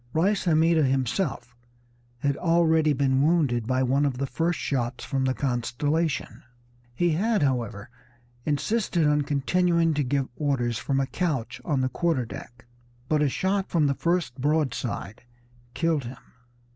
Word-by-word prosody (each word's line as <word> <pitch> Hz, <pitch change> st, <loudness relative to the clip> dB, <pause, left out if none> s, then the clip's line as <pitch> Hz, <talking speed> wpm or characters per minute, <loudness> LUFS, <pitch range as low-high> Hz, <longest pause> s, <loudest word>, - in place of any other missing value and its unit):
Reis 195 Hz, +6 st, +1 dB
Hammida 165 Hz, -1 st, +4 dB
himself 130 Hz, -, -1 dB, 0.7 s
had 140 Hz, -1 st, +1 dB
already 160 Hz, -2 st, +3 dB
been 135 Hz, -1 st, +2 dB
wounded 140 Hz, -8 st, +2 dB
by 130 Hz, +1 st, +1 dB
one 135 Hz, +3 st, +2 dB
of 140 Hz, -3 st, 0 dB
the 140 Hz, -, -1 dB
first 165 Hz, +7 st, -1 dB
shots 125 Hz, -3 st, -2 dB
from 135 Hz, -1 st, -1 dB
the 130 Hz, 0 st, 0 dB
Constellation. 145 Hz, +5 st, -1 dB, 0.5 s
He 175 Hz, +5 st, +2 dB
had, 205 Hz, +4 st, +1 dB
however, 115 Hz, -6 st, -2 dB, 0.5 s
insisted 170 Hz, -, 0 dB
on 150 Hz, 0 st, +3 dB
continuing 165 Hz, +4 st, +1 dB
to 145 Hz, -1 st, 0 dB
give 135 Hz, +1 st, 0 dB
orders 130 Hz, -6 st, -1 dB
from 135 Hz, -1 st, -1 dB
a 135 Hz, -, +1 dB
couch 145 Hz, -5 st, -3 dB
on 145 Hz, -5 st, 0 dB
the 130 Hz, -, +1 dB
quarter 150 Hz, -2 st, 0 dB
deck, 120 Hz, +1 st, -10 dB, 0.4 s
but 155 Hz, -1 st, +2 dB
a 150 Hz, -, +3 dB
shot 190 Hz, +6 st, -1 dB
from 160 Hz, -4 st, +2 dB
the 140 Hz, -, +2 dB
first 165 Hz, -5 st, -1 dB
broadside 135 Hz, -6 st, -1 dB, 0.5 s
killed 165 Hz, -5 st, 0 dB
him. 125 Hz, +2 st, -7 dB
145 Hz, 145 wpm, -26 LUFS, 130-165 Hz, 0.7 s, Hammida